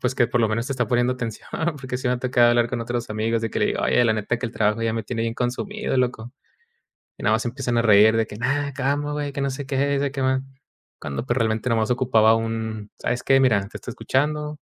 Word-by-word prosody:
pues, 125 +1 -1
que 120 - +4
por 120 0 +1
lo 110 - +3
menos 115 +3 -1
te 140 - -2
está 125 -4 -1
poniendo 120 +1 +2
atención 115 -4 -6 0.3
porque 130 -1 -4
sí 130 - -2
me 125 - +2
ha 125 - -4
tocado 125 -1 +3
hablar 120 0 +2
con 120 -2 -2
otros 120 -1 -3
amigos, 110 +1 -1
de 115 - -2
que - - -2
le - - +3
digo: - - -1
"Oye, - - +3
la 110 - +3
neta 110 +2 -2
que 120 - -3
el 115 - -8
trabajo 105 0 +1
ya 115 -1 0
me 115 - -2
tiene 115 0 -4
bien 115 0 -2
consumido 200 - -3
loco". 125 -1 -1 0.9
Y - - -10
nada 110 - +3
más 110 - -1
se - - -2
empiezan 125 -2 -2
a 115 - +4
reír 110 0 +6
de 110 - +1
que: 105 - -9
"Nada, 140 +4 -1
calma, 145 +2 -1
güey, 145 -1 -3
que 140 - -3
no 140 - 0
sé 135 +1 -6
qué 140 0 +1
y - - 0
si 140 -1 -1
que 135 -2 -4
más". 130 0 +2 0.6
Cuando 70 - -5
pues 120 - 0
realmente 110 +1 0
nada 115 -1 +2
más 110 - -1
ocupaba 115 -3 +4
un: 110 -2 -4
"¿Sabes 125 - -2
qué? 135 0 +4
Mira, 115 -7 +4
te - - -8
estoy 125 - -8
escuchando. 150 +5 -1
120 Hz, 275 wpm, -23 LUFS, 115-135 Hz, 0.9 s, reír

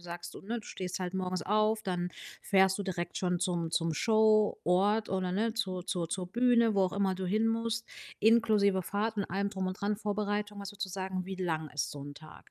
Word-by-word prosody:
sagst, 175 0 -7
du, - - -9
ne 230 +4 -3
du - - -15
stehst 185 -1 -4
halt 180 -1 -3
morgens 185 -1 -2
auf, 215 +1 +2
dann 180 -3 -2 0.3
fährst 190 -1 +4
du - - -1
direkt 175 -3 -4
schon 180 -1 0
zum 175 -2 -1
zum 165 0 +1
Show-Ort 215 0 +3
oder, 185 -1 -1
ne, 220 +4 +1
zur 185 -5 -2
zur 170 -2 -2
zur 185 0 -2
Bühne, 235 -2 +4
wo 195 - +4
auch 185 - -1
immer 195 -2 +1
du 185 0 -4
hin 215 +5 +2
musst, 230 0 -1 0.3
inklusive 210 -4 +4
Fahrt 210 +5 -2
und 200 - +1
allem 200 +2 -1
drum 190 -2 -3
und 185 +1 -4
dran, 205 +1 0
Vorbereitung. 205 0 -2
Was 200 -1 -6
würdest 200 -1 -4
du - - -10
sagen, 190 0 -3
wie 190 0 -5
lang 160 -4 -2
ist 145 - -2
so 145 - -7
'n 145 0 -8
Tag? 155 +1 -14
195 Hz, 220 wpm, -31 LUFS, 180-215 Hz, 0.3 s, fährst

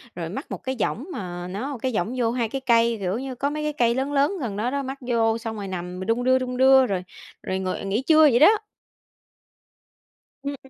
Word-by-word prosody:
rồi 165 -2 -4
mắc 270 - -7
một - - -3
cái 260 0 -2
võng 255 +8 -1
mà 175 -2 -5
nó 245 +9 -4
cái 260 - -1
võng 205 +8 -1
vô 230 -2 +1
2 235 -3 -1
cái 270 +2 -4
cây, 235 -2 +3
kiểu 190 +4 -1
như, 265 -1 -5
có 280 +3 -1
mấy 300 +1 -4
cái 300 0 -1
cây 235 -3 +2
lớn 275 +2 -2
lớn 285 +7 +2
gần 210 -6 -3
đó 240 +4 -1
đó, 280 0 -2
mắc 265 +1 -5
vô 230 -2 +1
xong 225 -1 -5
rồi 200 -1 -5
nằm 180 0 -5
mà 190 - -5
đung 230 +2 0
đưa 260 0 +4
đung 250 -1 -4
đưa, 265 0 +6
rồi 185 -2 -2 0.4
rồi 190 0 -2
ngồi, 185 -1 -2
à, - - -7
nghỉ 200 +5 -1
trưa 315 -1 +6
vậy 265 -6 +6
đó. 315 - +8 1.9
Ưm. 280 0 -4
240 Hz, 240 wpm, -24 LUFS, 205-270 Hz, 1.9 s, đó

